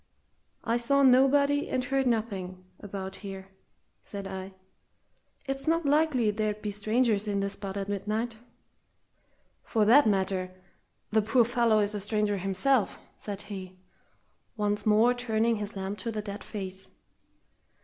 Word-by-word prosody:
"I 235 0 +1
saw 280 +4 +2
nobody 280 +2 +4
and 255 - 0
heard 270 +1 0
nothing 195 -6 -2
about 190 -2 -6
here," 195 -1 -8 0.5
said 200 -1 -7
I. 190 0 -7 0.9
"It's 270 +2 -4
not 330 0 +2
likely 285 -6 +3
there'd 210 0 -2
be 210 - -2
strangers 215 +1 +1
in 200 -1 0
this 200 0 0
spot 195 -1 -4
at 195 -1 -3
midnight." 215 +3 -2 1.2
"For 220 -2 +1
that 245 +4 +6
matter, 190 -2 0 0.6
the 220 0 +4
poor 225 +3 +3
fellow 235 -2 +2
is 205 0 +1
a 210 - -2
stranger 210 0 0
himself," 195 +6 +1 0.2
said 205 -1 -6
he, 190 -2 -8 0.8
once 210 0 -1
more 220 +3 +5
turning 230 -2 0
his 205 0 -5
lamp 195 +1 -4
on 230 - -1
the 215 - -2
dead 205 0 -6
face. 190 -2 -6
210 Hz, 140 wpm, -28 LUFS, 195-240 Hz, 1.2 s, that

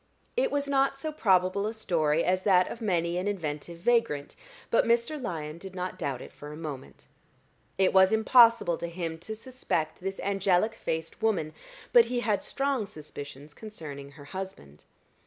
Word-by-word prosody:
It - - +2
was 285 0 0
not 275 0 +2
so 310 +3 -3
probable 195 -6 +2
a 220 - -4
story 165 -6 +1
as 185 +1 +2
that 185 -2 +4
of 235 - -8
many 175 -4 0
an 185 - -2
inventive 165 -4 -3
vagrant; 210 -7 +1 0.4
but - - +5
Mr. 235 +6 +1
Lyon 160 -7 -4
did 190 +1 -9
not 180 0 -4
doubt 135 -3 -3
it - - -12
for 145 0 -10
a 150 - -8
moment. 150 -5 -8 0.7
It 190 -1 +3
was 190 0 +6
impossible 225 -5 +5
to 170 - -3
him 165 -1 -4
to 220 +6 -6
suspect 220 -10 -3
this 195 +1 -4
angelic 195 +1 +2
faced 160 -7 -4
woman, 180 -9 +1 0.4
but 475 -2 +8
he 245 -1 -1
had 215 -4 0
strong 275 -6 -1
suspicions 145 -4 -8
concerning 145 -10 -8
her 145 -1 -13
husband. 145 - -8
185 Hz, 170 wpm, -28 LUFS, 160-225 Hz, 0.7 s, but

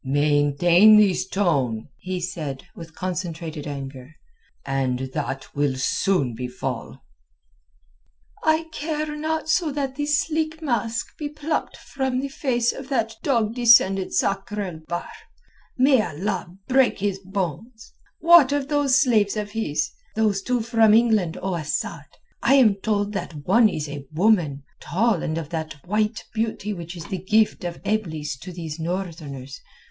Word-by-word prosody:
"Maintain 145 +8 +5
this 200 -4 +3
tone," 135 - 0
he 185 0 -4
said, 155 -6 -5
with 165 -1 -11
concentrated 170 -4 -4
anger, 135 0 -7 0.5
"and 130 -1 -1
that 135 0 -4
will 145 -2 +1
soon 135 - +1
befall." 125 +2 -5 1.4
"I 315 +1 +3
care 305 -1 -3
not 315 +1 -2
so 315 0 +2
that 270 -2 -3
the 290 0 -1
sleek 310 +2 0
mask 230 -6 -2
be 295 -2 -3
plucked 300 +1 -3
from 265 -2 -2
the 275 +1 -3
face 245 -4 0
of 270 0 -9
that 225 -5 0
dog 230 -6 +1
descended 225 -6 +5
Sakr 200 +1 -1
el 180 -5 -5
Bahr. 175 0 -3 0.7
May 260 -1 +5
Allah 185 +2 -3 0.2
break 265 -1 +3
his 195 -1 -1
bones! 195 - -5 0.2
What 335 -5 +7
of 285 -1 -1
those 290 -3 +3
slaves 220 -6 +2
of 210 -1 -3
his—those 205 +2 -1
two 250 +2 0
from 225 -1 +4
England, 220 -8 +3
O 190 -1 -1
Asad? 155 -4 -3 0.4
I 275 - +4
am 240 -7 +6
told 205 -1 0
that 165 -7 -5
one 230 -2 +5
is 155 -5 -4
a 145 -1 -7
woman, 160 -6 +2 0.2
tall 210 -1 +1
and 155 - -2
of 160 -3 -5
that 160 -3 -4
white 210 +4 0
beauty 220 -2 -2
which 170 -1 -7
is 165 - -7
the 190 - -4
gift 215 0 +2
of 175 -1 -4
Eblis 160 -10 -2
to 180 +6 -8
these 165 -2 -6
Northerners. 160 -7 -5
195 Hz, 145 wpm, -23 LUFS, 160-240 Hz, 1.4 s, What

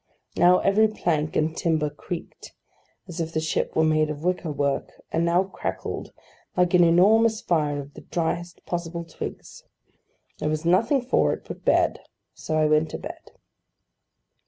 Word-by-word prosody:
Now 180 +1 +6
every 215 +2 +4
plank 160 -7 -1
and 155 +1 +1
timber 155 -3 0
creaked, 165 +3 -8 0.5
as 175 -2 -5
if 165 0 -4
the 155 - +1
ship 160 0 -1
were 160 - +3
made 155 -1 +2
of 150 0 -5
wicker 180 -2 -1
work; 140 -1 -1 0.2
and 165 - +1
now 170 +2 +3
crackled, 195 - -5 0.5
like 180 0 +3
an 180 -1 +6
enormous 215 +6 +4
fire 150 -6 0
of 140 +1 -9
the - - -11
driest 170 +1 -3
possible 170 -1 -4
twigs. 165 - -8 0.8
There 150 - -1
was 155 +1 -2
nothing 225 - +3
for 255 - +2
it - - -8
but - - -8
bed; - - +2 0.3
so 155 - -3
I 155 - +3
went 155 +1 +3
to - - -5
bed. - - -9
165 Hz, 160 wpm, -25 LUFS, 155-180 Hz, 0.8 s, Now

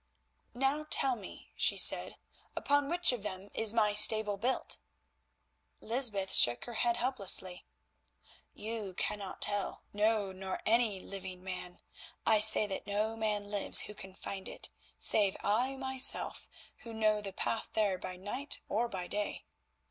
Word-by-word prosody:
"Now 275 +4 -1
tell 265 -2 0
me," 205 -5 -12
she - - +1
said, - - +5 0.4
"upon 285 0 0
which 350 -2 +3
of 245 -4 -5
them 195 -1 -7
is 225 -2 +3
my 215 -2 +1
stable 210 0 +5
built?" 245 +6 -2 1.0
Lysbeth 215 -5 -1
shook 120 0 +5
her 240 - -8
head 235 +1 0
helplessly. 195 -7 -1 0.9
"You 215 -4 -6
cannot 200 0 -3
tell, 205 -1 -3
no, 210 -1 0
nor 190 0 -6
any 225 -3 +2
living 185 -2 -7
man; 180 -1 -7 0.4
I 220 -1 +4
say 215 0 +6
that 195 -2 -6
no 210 +2 -1
man 210 -2 -3
lives 205 -1 +6
who 210 - -7
could 190 -2 -11
find 190 -1 -6
it, - - -6 0.3
save 200 -3 +2
I 245 +6 0
myself, 265 -1 +2 0.3
who 230 - -11
know 215 -1 +1
the 200 -1 -5
path 225 +3 -3
there 205 -4 0
by 185 - -7
night 205 +10 -2
or 230 +4 -1
by 185 -4 -6
day. 205 +3 -4
210 Hz, 150 wpm, -31 LUFS, 195-230 Hz, 1.0 s, say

